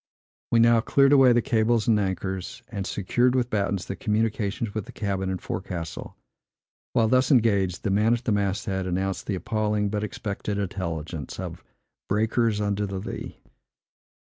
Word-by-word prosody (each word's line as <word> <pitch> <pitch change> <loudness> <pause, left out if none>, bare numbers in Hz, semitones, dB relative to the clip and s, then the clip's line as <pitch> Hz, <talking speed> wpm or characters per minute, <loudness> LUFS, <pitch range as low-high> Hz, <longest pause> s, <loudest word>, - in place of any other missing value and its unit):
We 115 - +4
now 115 0 +5
cleared 140 +3 +4
away 135 -3 +7
the 120 -1 +3
cables 110 -1 +2
and 110 -2 +4
anchors, 95 -1 -3
and 95 -1 -4
secured 120 +6 +1
with 125 -1 0
battens 100 -3 0
the 100 - -4
communications 105 0 -1
with 110 -3 -4
the - - -9
cabin 95 -3 -2
and 95 -1 -2
forecastle. 85 -3 -5 0.8
While 115 -2 +3
thus 130 +2 +3
engaged, 100 - +2
the 105 - 0
man 110 +4 +3
at 120 - -7
the 115 - 0
mast 100 0 0
head 95 -2 -2
announced 95 +1 -2
the 100 - 0
appalling, 105 +2 0
but 105 0 -2
expected 105 -1 -4
intelligence, 85 -6 -4
of - - -6 0.5
"breakers 110 +1 +1
under 105 0 0
the 95 0 -4
lee." 95 - -7
105 Hz, 165 wpm, -25 LUFS, 95-115 Hz, 0.8 s, away